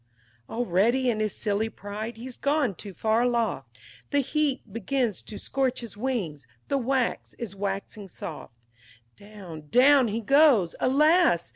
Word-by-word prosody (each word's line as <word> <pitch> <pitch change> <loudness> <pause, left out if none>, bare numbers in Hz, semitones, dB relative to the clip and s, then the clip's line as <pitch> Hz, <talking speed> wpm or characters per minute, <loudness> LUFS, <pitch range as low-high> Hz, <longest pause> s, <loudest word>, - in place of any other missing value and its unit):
XI - - -11
Already, 240 +3 +2
in 215 - -3
his 215 -1 -1
silly 210 +2 -1
pride, 215 +2 -7
he's 245 +2 -8
gone 280 -6 +1
too 200 +3 -9
far 220 +5 +1
aloft; 220 - -1 0.3
The 285 - +2
heat 275 -5 -1
begins 230 -2 -1
to 210 - -9
scorch 265 -2 -1
his 235 -3 -9
wings; 200 - -3 0.2
the 280 - +1
wax 260 0 -1
is 215 -5 -7
waxing 200 +1 -4
soft; 160 -8 -8 0.6
Down 190 -7 -11
down 265 - +6
he 220 +1 -2
goes! 260 - +4
Alas! 300 - +3
230 Hz, 145 wpm, -26 LUFS, 200-260 Hz, 0.6 s, down